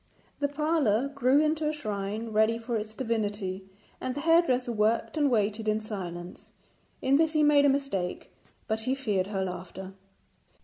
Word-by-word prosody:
The 285 - +1
parlour 285 -5 +1
grew 275 0 +3
into 310 0 +1
a - - +2
shrine 215 -5 -4
ready 220 +1 +2
for 230 +1 -4
its 215 0 -4
divinity, 205 -5 -2 0.3
and 255 0 -3
the 285 - -3
hairdresser 290 -7 +3
worked 220 +4 +1
and 295 -2 +2
waited 215 -2 0
in 215 0 +2
silence. 180 -5 -7 0.5
In 270 +1 +4
this 320 0 +2
he 305 -1 +3
made 290 -1 +5
a - - +6
mistake, 270 -10 -2 0.3
but 220 0 -1
he 255 +4 0
feared 210 -9 -1
her 195 -2 -2
laughter. 185 +1 -7
230 Hz, 165 wpm, -28 LUFS, 205-280 Hz, 0.5 s, a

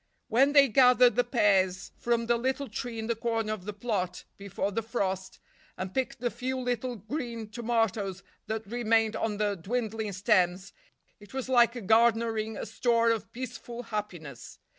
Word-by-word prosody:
When 270 +5 +4
they 280 -1 +7
gathered 250 0 +5
the 245 - +3
pears 195 -6 +2
from 235 -1 0
the 235 +1 +2
little 265 +3 -1
tree 235 +1 -5
in 220 - -3
the 235 - 0
corner 225 -1 -1
of 195 -4 -8
the 210 - -3
plot, 200 -4 -3
before 200 0 -3
the 225 +3 -1
frost, 190 -4 -3 0.4
and 185 0 -5
picked 260 -2 -2
the 240 0 -1
few 260 +1 -3
little 250 0 -2
green 230 0 -5
tomatoes 220 -4 -1 0.2
that 220 +1 -3
remained 225 0 +1
on 220 -2 -2
the 205 -1 +1
dwindling 220 +2 -3
stems, 185 -1 +1 0.5
it 205 +4 -14
was 265 -1 -3
like 240 -3 +3
garnering 225 0 +2
a - - -4
store 230 +1 +2
of 225 -2 -3
peaceful 245 -1 -7
happiness. 175 - -6
225 Hz, 160 wpm, -29 LUFS, 205-240 Hz, 0.5 s, they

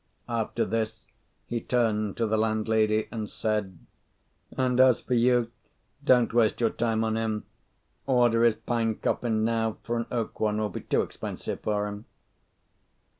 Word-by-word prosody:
After 115 0 -1
this 110 -1 -3 0.4
he 120 -1 -3
turned 110 -5 0
to 115 - +1
the 110 0 +1
landlady, 110 0 +1
and 110 -3 -4
said, 105 -4 -2 0.8
"And 125 -1 +1
as 130 -2 +6
for 125 - -3
you, 120 -1 +3 0.5
don't 125 -3 +4
waste 115 -2 +3
your 115 -2 +2
time 115 -1 0
on 110 0 0
him: 110 -1 -2 0.6
order 120 -3 +4
his 115 -2 +4
pine 115 -2 -1
coffin 110 -1 0
now, 115 -1 0
for 120 +1 -2
an 115 - -2
oak 115 -3 -3
one 105 -1 +1
will 105 -1 0
be - - -6
too - - +1
expensive - - -6
for 105 -1 -1
him." 105 +1 -6
115 Hz, 155 wpm, -27 LUFS, 110-120 Hz, 0.8 s, as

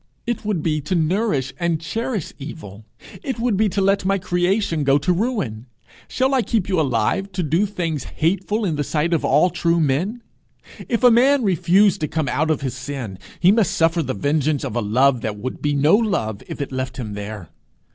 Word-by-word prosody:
It 235 -2 -2
would 205 -7 -1
be 155 -2 0
to 150 +6 -2
nourish 160 - 0
and 170 -2 0
cherish 225 - -3
evil! 110 - -9 0.4
It 265 -3 -4
would 230 -2 0
be 215 +2 +2
to 195 +1 -1
let 195 0 +2
my 195 +1 +1
creation 175 -2 0
go 140 0 +4
to 145 +5 +1
ruin. 175 - -2 0.4
Shall 265 +1 0
I 260 - +3
keep 225 -4 -1
you 185 -4 +1
alive 135 - 0
to 180 -1 -1
do 165 +7 +1
things 165 -7 -3
hateful 195 +6 -1
in 160 -5 -1
the 145 - 0
sight 155 +4 0
of 165 - +1
all 155 +6 +3
true 170 0 +1
men? 170 - 0 0.7
If 235 0 0
a 245 - +8
man 260 +3 +4
refuse 195 +1 +3
to 155 - -1
come 155 -2 -2
out 155 +1 0
of 155 - 0
his 130 -4 -3
sin, 130 -7 -6 0.2
he 180 - +5
must 210 -4 +2
suffer 165 +1 +3
the 130 -6 -3
vengeance 145 +5 0
of 125 -5 -4
a 120 - +1
love 125 +4 +2
that 105 -2 -3
would 125 +5 -6
be 145 -1 0
no 145 +4 +3
love 190 - -1
if - - -6
it 140 - -4
left 130 -1 -4
him 110 -5 -5
there. 100 -4 -7
165 Hz, 205 wpm, -21 LUFS, 135-200 Hz, 0.7 s, a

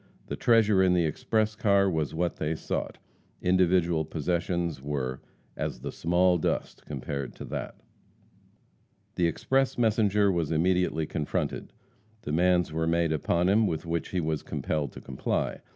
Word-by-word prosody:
The - - -4
treasure 110 -4 +4
in 90 -1 +4
the 85 -2 +3
express 110 +7 0
car 100 -2 +3
was 80 -4 -1
what 85 +1 -1
they 80 +1 -1
sought. - - -4 0.4
Individual 90 -3 +2
possessions 85 0 -2
were 65 -2 -3 0.3
as - - -4
"the - - -4
small 90 +1 +2
dust" - - -2
compared 70 -2 -5
to - - -8
that. - - -5 1.4
The 85 - +2
express 135 +10 0
messenger 105 -3 +3
was 85 -4 -1
immediately 85 -1 +1
confronted. 75 -1 -3 0.5
Demands 90 +2 +2
were 80 +1 0
made 85 -1 +2
upon 85 +3 +1
him 105 +3 +4
with 80 -2 -3
which 85 -1 -2
he 90 - -1
was 80 -2 -1
compelled 75 -4 -2
to - - -10
comply. 65 - -2
85 Hz, 145 wpm, -28 LUFS, 80-95 Hz, 1.4 s, treasure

